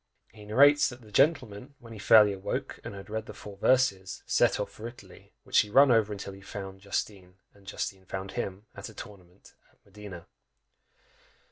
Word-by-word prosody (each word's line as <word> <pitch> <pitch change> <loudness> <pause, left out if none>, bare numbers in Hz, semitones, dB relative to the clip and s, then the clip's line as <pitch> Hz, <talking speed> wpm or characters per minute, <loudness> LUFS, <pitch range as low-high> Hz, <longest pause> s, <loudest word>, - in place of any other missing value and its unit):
He 105 -1 -13
narrates, 145 +7 +5
that 125 -1 -11
the 110 - -16
gentleman, 130 -2 +1
when 115 -3 -13
he 110 - -10
fairly 105 0 +6
awoke, 95 0 -4
and - - -7
had 95 - -10
read 110 +1 -5
the - - -9
"four 100 -1 -11
verses," 100 -6 +1
set - - +2
off - - -3
for 110 - -8
Italy, 120 +1 -14
which - - +3
he 105 - +1
run 135 +4 +6
over 110 -3 +2
till 100 0 -7
he 95 - -13
found 95 -1 -8
Justine, 95 -2 -4 0.2
and 100 -1 -22
Justine 95 -1 -5
found 95 +1 -6
him, 100 -3 -5
at - - -8
a - - -15
tournament 95 -2 -13 0.2
at - - -32
Modena! 100 -4 -11
105 Hz, 190 wpm, -28 LUFS, 95-115 Hz, 0.2 s, fairly